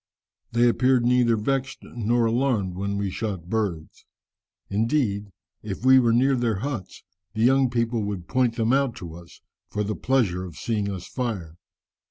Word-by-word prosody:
They 120 +1 +4
appeared 125 0 +3
neither 120 -1 +4
vexed 135 +4 -1
nor 120 0 0
alarmed 115 -5 +1
when 100 +2 -3
we 100 -1 -2
shot 95 -5 -4
birds. 100 -8 -3 0.6
Indeed, 105 -1 0 0.3
if 105 +3 -6
we 130 0 +8
were 120 -2 +3
near 130 +4 +3
their 115 -5 0
huts, 115 -10 -5 0.3
the 110 - +1
young 135 +1 +4
people 115 -1 0
would 95 -4 -5
point 125 -3 +1
them 115 +1 +1
out 135 -3 +1
to 85 -3 -8
us, 85 0 -13 0.3
for 105 - -2
the 105 +1 -2
pleasure 110 -9 +1
of 90 -4 -9
seeing 105 -3 -1
us 95 -3 -6
fire. 105 -11 -4
115 Hz, 165 wpm, -25 LUFS, 100-125 Hz, 0.6 s, we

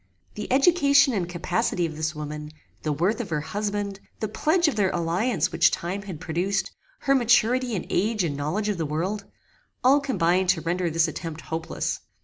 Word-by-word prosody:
The 210 - -6
education 280 -1 +5
and 180 -5 -1
capacity 175 0 0
of 160 -2 -5
this 155 0 -2
woman, 150 0 -6 0.3
the 155 - -1
worth 180 - +1
of 210 - -7
her 150 -2 -1
husband, 205 +2 -3 0.2
the 215 - -1
pledge 315 - +2
of 300 - 0
their 200 -3 +2
alliance 175 +9 0
which - - +5
time 185 +4 -3
had 190 -6 -7
produced, 185 +3 -1 0.3
her 275 - +3
maturity 245 -1 +3
in 180 - -3
age 210 +1 +1
and 150 -4 -1
knowledge 155 +9 -2
of 205 -4 -1
the 160 - 0
world 185 +7 -2 0.6
all 270 +3 +6
combined 185 - +1
to 180 -3 +3
render 175 +1 -1
this 165 +1 +2
attempt 160 0 -6
hopeless. 160 0 -3
185 Hz, 180 wpm, -25 LUFS, 165-220 Hz, 0.6 s, all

